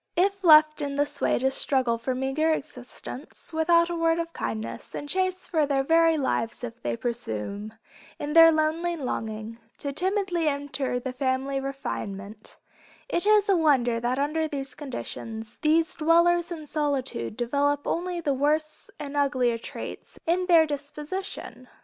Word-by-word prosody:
If 390 +2 +1
left 305 -2 +7
in 280 -1 -2
this 290 +1 0
way - - +2
to 265 +2 +1
struggle 255 -4 +1
for 255 +2 -2
a - - -5
meager 270 +5 +1
existence, 275 +1 -7
without 335 +1 +4
a 345 - -3
word 330 0 +2
of 335 0 -3
kindness, 115 0 -5
and 290 - -5
chased 370 +2 -1
for 310 -4 +2
their 275 -1 +1
very 330 +2 +4
lives 240 -4 -1
if 230 -1 -7
they 120 -1 -2
presume, 210 - -4 0.4
in 295 +1 -4
their 330 0 +9
lonely 320 +2 0
longing, 225 -5 -4 0.2
to 280 -1 -4
timidly 370 -1 0
enter 280 -3 -1
the 255 +1 -5
family 265 +1 -1
refinement, 215 -6 -6 0.5
is 345 +4 0
it 425 -1 +5
a 395 - +4
wonder 260 -8 +3
that 240 +2 -1
under 305 +3 0
these 275 -3 -5
conditions, 230 -5 -7
these 325 +3 +3
dwellers 340 +2 +3
in 315 -3 -6
solitude 275 - -2
develop 285 +4 0
only 355 +1 -2
the 295 -4 0
worse 305 +3 0
and 290 -1 -6
uglier 255 -5 +1
traits - - -8
in 360 +2 +1
their 335 -3 +6
disposition? 290 -2 -6
290 Hz, 155 wpm, -26 LUFS, 250-330 Hz, 0.5 s, their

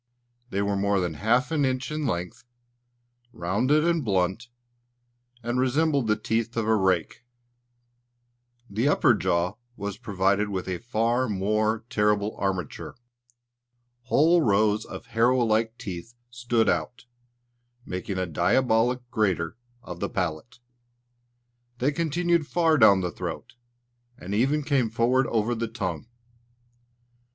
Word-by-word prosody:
They 100 -3 -1
were 100 0 0
more 100 0 +1
than 90 -3 -2
half 120 - +1
an 155 -3 +1
inch 130 +1 -1
in 150 -2 -2
length, 90 0 -4 0.9
rounded 125 - +1
and 170 -3 +1
blunt, 95 +2 0 1.0
and 120 +2 -1
resembled 140 0 +1
the 110 - +3
teeth 115 +2 -2
of 110 -1 0
a 110 - +4
rake. 95 0 0 1.4
The 110 +6 -1
upper 130 -3 +4
jaw 90 -2 0 0.2
was 100 +1 -5
provided 100 -2 0
with 95 -2 -4
a 90 -1 -3
far 120 +2 0
more 110 +3 0
terrible 105 -2 +1
armature. 95 -5 -3 1.1
Whole 160 +6 +4
rows 105 -2 +2
of - - -9
harrow 115 +2 +2
like 110 +1 0
teeth 95 +5 -7 0.2
stood 120 -2 0
out, 125 0 -1 0.8
making 90 +1 -4
a 95 - 0
diabolical 120 - +1
grater 95 -8 0 0.3
of 90 -5 -8
the 100 - -2
palate. 90 +5 -4 1.2
They 130 +4 +1
continued 170 +1 0
far 160 -3 +2
down 100 -4 +6
the 90 -1 -2
throat, - - -6 0.6
and 95 +3 -7
even 135 +8 +1
came 135 -5 +1
forward 120 +3 +2
over 115 +1 0
the 115 0 -2
tongue. 90 -4 -4
110 Hz, 125 wpm, -26 LUFS, 100-125 Hz, 1.4 s, down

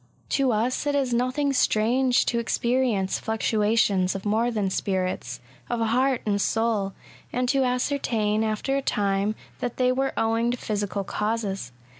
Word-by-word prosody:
To 270 -2 +2
us 235 +6 0
it 290 - +1
is 265 -3 +1
nothing 255 +4 +1
strange 250 +2 +2
to 235 - 0
experience 235 -4 0
fluctua 220 0 0
tions 190 -4 +2
of 195 - -6
more 220 +3 +2
than 210 -5 -1
spirits 185 -11 -2 0.2
— - - -28
of 240 - -1
heart 250 +3 +1
and 205 -1 +1
soul, 220 -4 0 0.4
and 250 0 0
to 270 +1 +3
ascertain, 245 -4 0
after 220 +5 -1
a 275 - +1
time, 200 -2 0 0.2
that 245 -1 -3
they 255 -1 +3
were 270 +1 0
owing 225 +1 +1
to 245 - -1
physical 205 -3 -2
causes. 205 - -2
225 Hz, 160 wpm, -25 LUFS, 205-250 Hz, 0.4 s, to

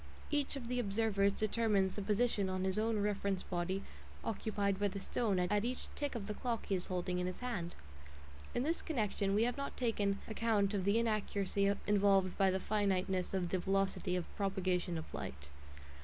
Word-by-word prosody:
Each 290 -1 0
of 255 -4 -5
the 250 +1 0
observers 200 -2 +2
determines 210 -2 +1
the 205 - -4
position 210 -1 +1
on 185 0 -1
his 190 +2 +1
own 225 0 +1
reference 200 -2 0
body 185 +2 -2 0.4
occupied 200 -3 -1
by 205 - +3
the 200 0 -4
stone 205 0 0
at 205 +4 +2
each 250 +2 -3
tick 290 -3 -2
of 220 -4 -3
the 210 - -3
clock 235 +1 -2
he - - -1
is 180 -2 0
holding 180 0 -1
in 180 - 0
his 185 - -5
hand. 195 -9 -3 0.8
In 245 - +1
this 325 +4 0
connection 210 -8 0
we 215 - +4
have 245 +2 0
not 280 0 -4
taken 205 -5 +1
account 215 -2 +1
of 195 -2 0
the 200 +2 +4
inaccuracy 200 -3 +1
involved 195 -2 +4
by 195 -1 +4
the 190 0 +1
finiteness 190 -2 0
of 180 -2 0
the 185 - +1
velocity 195 -1 +1
of 180 -2 -1
propagation 185 -3 0
of 160 - -4
light. 70 +1 -6
200 Hz, 185 wpm, -35 LUFS, 190-220 Hz, 0.8 s, we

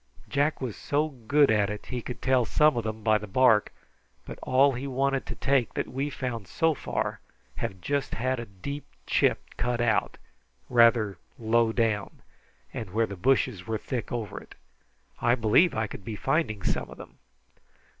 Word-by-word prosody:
Jack 145 +2 +1
was 125 -5 -3
so 150 +2 0
good 140 +1 +2
at 105 -2 +2
it 105 0 -6
he 125 -1 -4
could 125 - -7
tell 130 -1 +3
some 150 +5 +3
of 120 - -1
them 110 0 -5
by 110 -1 +3
the 105 - -8
bark, 110 0 +4 0.5
but - - -9
all 135 +2 +4
he 130 +3 -4
wanted 135 0 0
to - - -5
take 135 -3 +1
that - - -1
we've 140 +3 -3
found 120 -6 -4
so 160 - +1
far - - -3 0.4
have 100 -5 -4
just 140 +5 -1
had 130 +2 -1
a 120 - -6
deep 140 +10 -6 0.2
chip - - +2
cut 125 0 -1
out, 120 -2 +1 0.5
rather 115 -5 +4 0.2
low 115 -1 +2
down, 110 -4 -1 0.5
and 110 - -5
where 115 +1 +2
the 100 - -7
bushes 110 -1 +1
were 110 -1 -1
thick 120 +1 -5
over 115 -4 -4
it. - - -15 0.6
I 120 - +3
believe 120 +9 +4
I 110 0 0
could 100 - -9
be 110 0 -5
finding 130 - -1
some - - -1
of - - -11
them." - - -13
120 Hz, 180 wpm, -27 LUFS, 110-135 Hz, 0.6 s, bark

